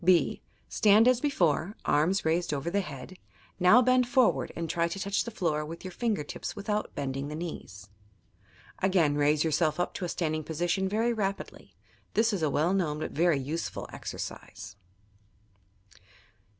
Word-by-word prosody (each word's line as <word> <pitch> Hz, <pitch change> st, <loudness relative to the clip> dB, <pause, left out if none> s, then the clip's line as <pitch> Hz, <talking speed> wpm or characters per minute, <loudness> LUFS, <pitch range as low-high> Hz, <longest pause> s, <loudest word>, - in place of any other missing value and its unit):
(b) 175 Hz, -1 st, +3 dB, 0.3 s
Stand 215 Hz, +2 st, +5 dB
as 250 Hz, -1 st, +4 dB
before, 185 Hz, -, +1 dB
arms 175 Hz, +5 st, +2 dB
raised 165 Hz, -1 st, +1 dB
over 145 Hz, +5 st, -3 dB
the 200 Hz, +2 st, +1 dB
head; 150 Hz, +2 st, -9 dB, 0.4 s
now 195 Hz, +8 st, +6 dB
bend 255 Hz, 0 st, +3 dB
forward 215 Hz, -, +2 dB
and 165 Hz, 0 st, -3 dB
try 170 Hz, +1 st, 0 dB
to 170 Hz, +3 st, -5 dB
touch 200 Hz, +1 st, 0 dB
the -, -, -4 dB
floor 165 Hz, -8 st, -1 dB
with 165 Hz, +4 st, -8 dB
your 185 Hz, -, -5 dB
finger 210 Hz, -4 st, -1 dB
tips 145 Hz, -, -6 dB
without 210 Hz, +1 st, -3 dB
bending 140 Hz, -1 st, -3 dB
the 150 Hz, -, -5 dB
knees. 100 Hz, -, -7 dB, 0.9 s
Again 185 Hz, -6 st, +3 dB
raise 145 Hz, +1 st, +2 dB
yourself 155 Hz, -1 st, +1 dB, 0.2 s
to -, -, -6 dB
a -, -, -4 dB
standing 155 Hz, -2 st, -2 dB
position 175 Hz, +5 st, -1 dB
very 225 Hz, +4 st, +1 dB
rapidly. 200 Hz, -3 st, -4 dB, 0.4 s
This 225 Hz, +1 st, +3 dB
is 195 Hz, -, -1 dB
a 155 Hz, -, +2 dB
well 155 Hz, +6 st, +1 dB
known 165 Hz, -6 st, 0 dB
but 155 Hz, -, -4 dB
very 170 Hz, -1 st, +2 dB
useful 150 Hz, +5 st, -4 dB
exercise. -, -, -7 dB
170 Hz, 160 wpm, -29 LUFS, 150-200 Hz, 0.9 s, now